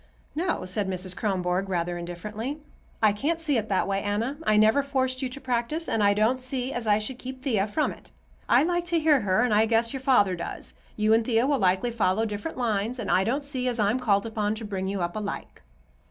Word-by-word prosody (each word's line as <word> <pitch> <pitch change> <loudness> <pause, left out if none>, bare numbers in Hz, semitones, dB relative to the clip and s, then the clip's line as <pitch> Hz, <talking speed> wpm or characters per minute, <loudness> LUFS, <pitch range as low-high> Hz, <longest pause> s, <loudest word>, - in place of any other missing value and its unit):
"No," 335 - -1
said 190 +2 -1
Mrs. 185 0 -3
Kronborg, 190 -2 -1
rather 175 -1 -1
indifferently, 210 - -5 0.5
"I 210 -2 +5
can't 305 +11 -1
see 300 -5 0
it 215 -1 -6
that 190 - +1
way, 195 0 0
Anna. 225 +8 -2
I 215 - +4
never 220 +6 +5
forced 260 -2 -1
you 260 - -2
to 255 - -8
practice, 260 +5 -2
and 220 - +1
I 200 0 +4
don't 220 +5 +2
see 255 0 -2
as 240 -2 -4
I 205 -1 +4
should 230 +4 -4
keep 260 0 -8
Thea 215 -7 +1
from 300 +9 0
it. - - -13 0.4
I 250 +4 +5
like 350 +1 0
to 340 -1 +1
hear 305 -4 +4
her, 205 +2 +2
and 245 -3 +1
I 215 +2 +4
guess 230 +1 +2
your 270 - -3
father 205 -9 +3
does. 170 - -6 0.2
You 215 +1 +3
and 225 +1 +4
Thea 230 +1 +2
will 280 0 +1
likely 190 +4 +2
follow 220 -1 +1
different 210 +9 -5
lines, 230 0 -1
and 225 -6 -3
I 190 - +4
don't 265 +8 -1
see 260 -3 -1
as 245 -1 0
I'm 210 +4 +2
called 205 -5 +2
upon 215 -1 -1
to 220 0 -7
bring 190 -2 -3
you 195 -1 -2
up 175 0 -3
alike." 210 -1 -5
220 Hz, 230 wpm, -26 LUFS, 200-260 Hz, 0.5 s, I